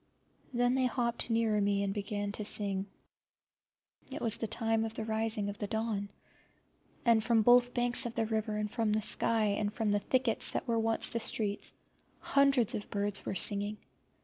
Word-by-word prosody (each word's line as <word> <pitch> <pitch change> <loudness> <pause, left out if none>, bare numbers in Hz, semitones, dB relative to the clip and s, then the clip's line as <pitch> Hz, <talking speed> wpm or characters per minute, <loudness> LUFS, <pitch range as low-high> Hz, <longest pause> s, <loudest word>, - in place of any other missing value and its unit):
Then 245 0 +1
they 260 -1 +1
hopped 240 -1 -1
nearer 225 -2 +1
me 200 0 +1
and 195 -1 -2
began 205 0 -4
to 210 - -4
sing. 200 -2 +1 1.2
It 285 - -5
was 230 -1 +3
the 225 - -3
time 225 0 -1
of 225 0 -5
the 220 - -4
rising 220 -1 0
of 205 0 -6
the 205 - -3
dawn, 220 -2 -3 1.0
and 230 -2 +4
from 225 -1 +2
both 245 +1 +4
banks 245 0 +5
of 230 - -9
the 225 - 0
river, 215 -1 -2
and 210 -1 -3
from 220 -2 -1
the 215 0 0
sky, 225 +1 +3
and 205 0 -1
from 215 -1 -2
the 205 - +1
thickets 260 +5 0
that - - -4
were 230 -1 0
once 225 0 +1
the 230 - -3
streets, 210 -2 -2 0.4
hundreds 275 -5 +2
of 205 - -5
birds 200 0 -2
were - - -3
singing. 205 +3 0
220 Hz, 185 wpm, -31 LUFS, 205-235 Hz, 1.2 s, banks